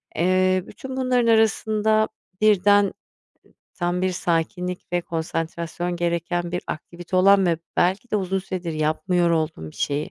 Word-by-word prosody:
Eee, 185 Hz, +2 st, +2 dB
bütün 265 Hz, 0 st, -8 dB
bunların 250 Hz, -2 st, +2 dB
arasında, 220 Hz, -1 st, +3 dB, 0.3 s
birden, 205 Hz, -1 st, +5 dB
eee, 195 Hz, -, -3 dB, 0.8 s
tam 175 Hz, 0 st, -1 dB
bir 185 Hz, -, +2 dB
sakinlik 180 Hz, +1 st, -2 dB
ve 175 Hz, -, +2 dB
konsantrasyon 170 Hz, +1 st, -3 dB
gereken 175 Hz, 0 st, -1 dB
bir 180 Hz, -, -2 dB
aktivite 175 Hz, +3 st, -5 dB
olan 195 Hz, +1 st, +5 dB
ve 165 Hz, -2 st, +1 dB, 0.2 s
belki 190 Hz, +7 st, +1 dB
de -, -, +2 dB
uzun 190 Hz, -1 st, -1 dB
süredir 185 Hz, -3 st, -4 dB
yapmıyor 170 Hz, +3 st, +1 dB
olduğun 155 Hz, -, -1 dB
bir -, -, -18 dB
şeyi 145 Hz, +1 st, -2 dB
180 Hz, 145 wpm, -23 LUFS, 170-200 Hz, 0.8 s, birden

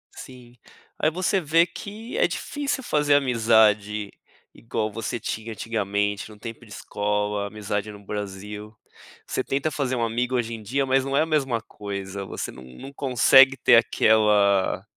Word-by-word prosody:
Sim, 125 Hz, -2 st, -12 dB, 0.4 s
aí 155 Hz, -, +3 dB
você 185 Hz, +3 st, 0 dB
vê 165 Hz, +2 st, +4 dB
que 215 Hz, +6 st, -8 dB
é -, -, +4 dB
difícil 285 Hz, -2 st, -3 dB
fazer 150 Hz, -7 st, +2 dB
amizade 110 Hz, -5 st, +2 dB, 0.4 s
igual 110 Hz, -2 st, -3 dB
você 115 Hz, +2 st, -4 dB
tinha 110 Hz, +2 st, -5 dB
antigamente 105 Hz, -1 st, -2 dB
no 105 Hz, -1 st, -14 dB
tempo 115 Hz, +2 st, -9 dB
de 105 Hz, -, -18 dB
escola, 105 Hz, 0 st, -2 dB
amizade 105 Hz, 0 st, -4 dB
no 100 Hz, -1 st, -13 dB
Brasil. 105 Hz, +1 st, -7 dB, 0.5 s
Você 130 Hz, -, -2 dB
tenta 140 Hz, +3 st, -1 dB
fazer 130 Hz, -3 st, -2 dB
um 120 Hz, -, -1 dB
amigo 120 Hz, +3 st, -1 dB
hoje 115 Hz, -1 st, -1 dB
em 110 Hz, -, -10 dB
dia, 135 Hz, +6 st, 0 dB
mas 135 Hz, 0 st, +2 dB
não 135 Hz, -, -2 dB
é 140 Hz, -, +4 dB
a -, -, +2 dB
mesma 135 Hz, -7 st, 0 dB
coisa, 100 Hz, -2 st, -6 dB
você -, -, -5 dB
num 65 Hz, -1 st, -13 dB
num 135 Hz, -, -9 dB
consegue 135 Hz, 0 st, +5 dB
ter 125 Hz, -2 st, +5 dB
aquela 105 Hz, -4 st, +3 dB
115 Hz, 160 wpm, -24 LUFS, 105-135 Hz, 0.5 s, consegue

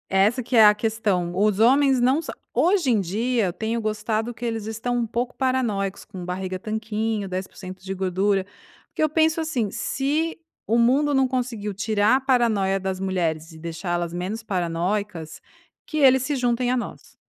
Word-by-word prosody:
Essa 205 Hz, +7 st, +2 dB
que 245 Hz, -, -2 dB
é 220 Hz, -2 st, +8 dB
a 210 Hz, 0 st, +7 dB
questão, 210 Hz, -5 st, -1 dB
os 205 Hz, +1 st, +2 dB
homens 265 Hz, +3 st, +5 dB
não 260 Hz, +5 st, +3 dB
são -, -, -7 dB, 0.2 s
hoje 335 Hz, -, +3 dB
em 220 Hz, -, +3 dB
dia 220 Hz, +5 st, 0 dB
eu 180 Hz, -, -2 dB
tenho 225 Hz, +4 st, -2 dB
gostado 215 Hz, +1 st, -2 dB
que 235 Hz, -, -12 dB
eles 225 Hz, -3 st, -2 dB
estão 225 Hz, +3 st, -2 dB
um 235 Hz, -1 st, 0 dB
pouco 240 Hz, +2 st, -2 dB
paranoicos, 230 Hz, -7 st, -1 dB
com 185 Hz, -4 st, -9 dB
barriga 185 Hz, +1 st, -4 dB
tanquinho, 215 Hz, -1 st, -2 dB
10% 185 Hz, 0 st, -6 dB
de 195 Hz, 0 st, -4 dB
gordura, 190 Hz, +1 st, 0 dB, 0.4 s
porque -, -, -5 dB
eu 310 Hz, -, +3 dB
penso 320 Hz, +1 st, +2 dB
assim, 275 Hz, -10 st, -1 dB
se 290 Hz, +8 st, -1 dB, 0.3 s
o 230 Hz, -, +2 dB
mundo 270 Hz, +5 st, +3 dB
não 265 Hz, -1 st, +3 dB
conseguiu 240 Hz, -5 st, -3 dB
tirar 210 Hz, +3 st, +2 dB
a -, -, -5 dB
paranoia 230 Hz, -7 st, +2 dB
das 190 Hz, -1 st, -3 dB
mulheres 170 Hz, -4 st, -1 dB
e -, -, -12 dB
deixá-las 170 Hz, +1 st, -3 dB
menos 190 Hz, +6 st, -4 dB
paranoicas, 180 Hz, -2 st, -2 dB, 0.4 s
que 310 Hz, -, -5 dB
eles 265 Hz, -3 st, +5 dB
se 290 Hz, +2 st, -1 dB
juntem 245 Hz, -1 st, +1 dB
a 255 Hz, -, +1 dB
nós. 240 Hz, -, -7 dB
220 Hz, 175 wpm, -24 LUFS, 190-250 Hz, 0.4 s, é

